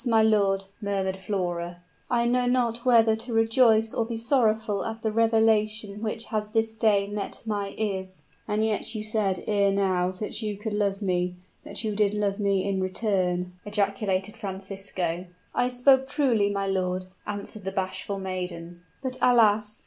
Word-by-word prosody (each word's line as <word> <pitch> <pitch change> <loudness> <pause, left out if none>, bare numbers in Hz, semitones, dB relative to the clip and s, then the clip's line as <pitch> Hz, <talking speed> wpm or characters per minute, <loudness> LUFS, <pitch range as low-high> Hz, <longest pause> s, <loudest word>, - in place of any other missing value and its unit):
my 225 -2 +4
lord," 200 -3 +3 0.2
murmured 195 -2 -1
Flora, 175 -3 -3 0.3
"I 235 -1 +2
know 245 +1 +2
not 240 -2 +1
whether 230 -3 +5
to 230 +1 -6
rejoice 225 -1 +4
or 230 - +1
be 230 +1 -4
sorrowful 220 -4 +1
at 225 0 -5
the 220 - +1
revelation 220 -2 +2
which 220 0 -3
has 210 -1 -1
this 225 0 0
day 210 -3 +3
met 205 0 -5
my 205 -2 -3
ears." 190 -3 -3 0.2
"And 215 0 +1
yet 220 +1 0
you 215 - -3
said 215 -4 -1
ere 200 -2 +3
now 190 -2 +1
that 210 +4 -5
you 210 -2 -3
could 210 +1 -4
love 205 -1 0
me, 180 -1 0 0.3
that - - -3
you 215 -2 -2
did 210 0 +2
love 205 -1 0
me 200 -1 +1
in 195 -1 0
return," 185 -2 0
ejaculated 200 -1 -1
Francisco. 190 -4 -4 0.3
"I 245 - +2
spoke 265 +2 +4
truly, 250 -8 +2
my 200 -1 -1
lord," 185 -1 -1 0.2
answered 205 0 -5
the 195 - -3
bashful 195 +1 -3
maiden; 180 -2 -5 0.2
"but, 255 -1 -4
alas! 215 -3 +4
210 Hz, 165 wpm, -26 LUFS, 195-225 Hz, 0.3 s, whether